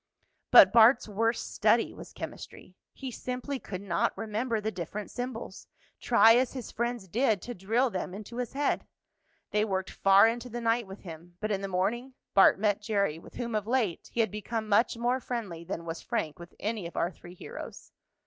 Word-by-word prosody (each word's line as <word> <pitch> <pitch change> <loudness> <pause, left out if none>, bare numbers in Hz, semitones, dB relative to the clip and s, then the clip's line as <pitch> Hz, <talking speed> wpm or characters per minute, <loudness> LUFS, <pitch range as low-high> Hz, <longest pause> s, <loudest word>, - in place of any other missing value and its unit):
But 190 +1 +9
Bart's 235 +2 +6
worst 225 +3 -1
study - - +3
was - - -11
chemistry. - - -9 0.2
He 265 -2 -7
simply 255 +3 -4
could 190 -4 -7
not 185 -1 0
remember 225 +2 -2
the 215 +1 -2
different 190 +3 -6
symbols, 245 -5 -6 0.3
try 225 +1 +6
as 255 0 +1
his 255 -4 -6
friends 235 -3 -3
did 220 +1 +1
to 245 - -5
drill 230 +6 +1
them 185 -1 -4
into 215 +3 -9
his 250 -1 -3
head. 285 +1 0 0.6
They 210 0 +2
worked 190 -3 -2
far 195 +2 +6
into 240 +2 -3
the 240 +1 -5
night 230 -1 +1
with 195 +1 -10
him, 170 0 -11
but 215 0 -2
in 195 -1 -1
the 195 - -3
morning, 235 +8 -1 0.2
Bart 195 - +6
met 205 0 +1
Jerry, 200 -7 0
with - - -15
whom, 235 -1 -4
of 215 -1 -1
late, 230 -8 0
he 235 - +1
had 220 - 0
become 215 +1 -4
much 220 +3 +3
more 245 +2 +1
friendly 215 -10 -5
than 170 -1 -5
was 165 0 -5
Frank 155 +2 -3
with 170 0 -12
any 215 -4 -3
of 170 - -11
our 170 - +1
three 175 0 -13
heroes. 470 - -9
215 Hz, 195 wpm, -29 LUFS, 190-240 Hz, 0.6 s, But